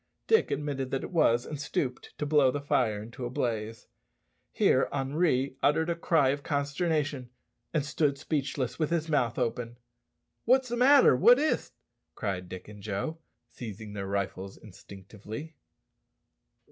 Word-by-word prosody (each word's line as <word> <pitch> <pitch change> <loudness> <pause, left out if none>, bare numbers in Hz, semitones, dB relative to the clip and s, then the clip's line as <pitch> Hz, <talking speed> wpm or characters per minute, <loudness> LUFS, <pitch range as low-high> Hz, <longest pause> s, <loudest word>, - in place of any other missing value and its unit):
Dick 445 0 +3
admitted 140 -3 -2
that 135 - -2
it - - -6
was, 120 -8 +3
and 150 -2 -6
stooped 130 -3 -3
to 150 - -2
blow 145 -3 +4
the 145 - -2
fire 115 -7 0
into 115 +3 -9
a 120 - -2
blaze. 115 -2 -3 0.7
Here - - +3
Henri 135 -1 0
uttered 160 +3 +2
a - - -1
cry 160 -5 +2
of 140 +1 -1
consternation, 145 -2 -1 0.4
and 150 -4 0
stood 145 -1 0
speechless, 140 -3 -2
with 155 - +1
his 165 -1 -1
mouth 125 -7 +1
open. 120 -1 -2 0.7
"What's 255 +1 +3
the 240 - -1
matter? 265 - +6
what 240 - +7
is't?" 305 +2 0 0.5
cried 95 -6 -3
Dick 95 - -8
and 105 -1 -11
Joe, 110 +11 -3 0.3
seizing 110 -3 -8
their 100 -1 -4
rifles 95 -1 -3
instinctively. 105 - -10
135 Hz, 145 wpm, -29 LUFS, 110-155 Hz, 0.7 s, what